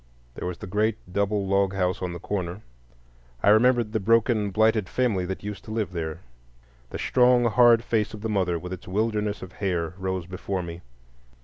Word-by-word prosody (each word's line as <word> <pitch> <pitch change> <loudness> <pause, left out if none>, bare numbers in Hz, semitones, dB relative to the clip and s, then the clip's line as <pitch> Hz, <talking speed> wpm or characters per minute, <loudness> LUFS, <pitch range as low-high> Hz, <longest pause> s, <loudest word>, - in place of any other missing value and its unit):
There - - -5
was 90 -1 -4
the - - -8
great 105 +4 0 0.2
double 100 0 0
log 100 0 +1
house 90 -1 0
on 90 -1 -2
the 85 - -5
corner. 90 +1 -4 0.8
I - - +5
remembered 120 +1 +4
the 110 - +1
broken, 110 0 +2
blighted 110 -1 +2
family 110 -8 0
that 95 +2 -5
used 105 0 -6
to - - -8
live 110 -3 -2
there. 80 -1 -4 0.7
The - - -5
strong, 125 -1 +4
hard 120 0 +5
face 110 -2 -1
of 105 - -10
the 110 - -2
mother, 95 -5 0
with 90 +2 -6
its 95 - -9
wilderness 105 +1 -1
of 95 - -9
hair, 90 -5 -2
rose 95 -2 -2
before 95 +1 -4
me. 85 0 -7
100 Hz, 190 wpm, -25 LUFS, 90-110 Hz, 0.8 s, I